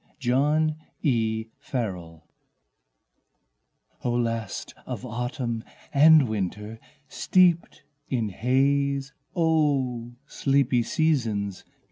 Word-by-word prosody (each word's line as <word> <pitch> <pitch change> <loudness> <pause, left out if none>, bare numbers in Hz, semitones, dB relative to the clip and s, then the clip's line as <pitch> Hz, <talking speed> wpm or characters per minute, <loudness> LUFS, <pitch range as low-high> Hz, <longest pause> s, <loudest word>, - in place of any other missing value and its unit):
Mists 125 -3 -2
and 150 +3 +2 1.0
Rains 90 - -4 1.8
O 120 - 0
last 115 -3 -2
of - - -5
Autumn 120 -1 -3 0.3
and 150 -1 +7
Winter 105 +1 -4 0.3
steeped 180 -2 +2 0.3
in 115 -5 0
haze, 135 +5 +1 0.2
O 140 -8 +1
sleepy 135 -3 +1
seasons! 115 -10 0
125 Hz, 75 wpm, -26 LUFS, 115-140 Hz, 1.8 s, and